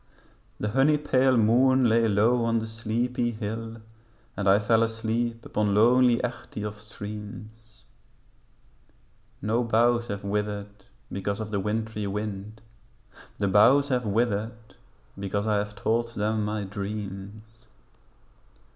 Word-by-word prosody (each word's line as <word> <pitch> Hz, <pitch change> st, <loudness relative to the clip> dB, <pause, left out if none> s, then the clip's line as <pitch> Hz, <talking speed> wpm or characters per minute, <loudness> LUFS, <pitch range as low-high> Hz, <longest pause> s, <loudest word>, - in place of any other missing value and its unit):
The 105 Hz, -, -1 dB
honey 135 Hz, +6 st, +3 dB
pale 130 Hz, -3 st, +2 dB
moon 125 Hz, +3 st, +4 dB
lay 115 Hz, 0 st, +3 dB
low 110 Hz, +4 st, +3 dB
on 115 Hz, 0 st, +1 dB
the 110 Hz, -, -2 dB
sleepy 115 Hz, +2 st, -2 dB
hill 115 Hz, +1 st, -5 dB, 0.6 s
And 100 Hz, -1 st, 0 dB
I 100 Hz, -, +6 dB
fell 110 Hz, +2 st, +2 dB
asleep 115 Hz, +1 st, -2 dB
upon 105 Hz, -1 st, 0 dB
lonely 120 Hz, +2 st, +5 dB
Echtge 120 Hz, -3 st, -5 dB
of 105 Hz, 0 st, -6 dB
streams; 105 Hz, +1 st, -10 dB, 1.6 s
No 115 Hz, +4 st, +1 dB
boughs 120 Hz, +1 st, +2 dB
have 100 Hz, -2 st, -5 dB
withered 105 Hz, 0 st, -4 dB, 0.3 s
because 100 Hz, +2 st, -3 dB
of 110 Hz, -1 st, -5 dB
the 100 Hz, -, 0 dB
wintry 105 Hz, +1 st, -2 dB
wind, 105 Hz, +1 st, -5 dB, 0.8 s
The 100 Hz, -, 0 dB
boughs 130 Hz, +9 st, +5 dB
have 125 Hz, -2 st, +1 dB
withered 110 Hz, 0 st, -2 dB, 0.5 s
because 100 Hz, +1 st, -2 dB
I 105 Hz, -1 st, +2 dB
have 105 Hz, 0 st, -4 dB
told 115 Hz, +2 st, -1 dB
them 105 Hz, +1 st, 0 dB
my 105 Hz, 0 st, -2 dB
dreams. 105 Hz, +3 st, -7 dB
110 Hz, 125 wpm, -26 LUFS, 105-115 Hz, 1.6 s, I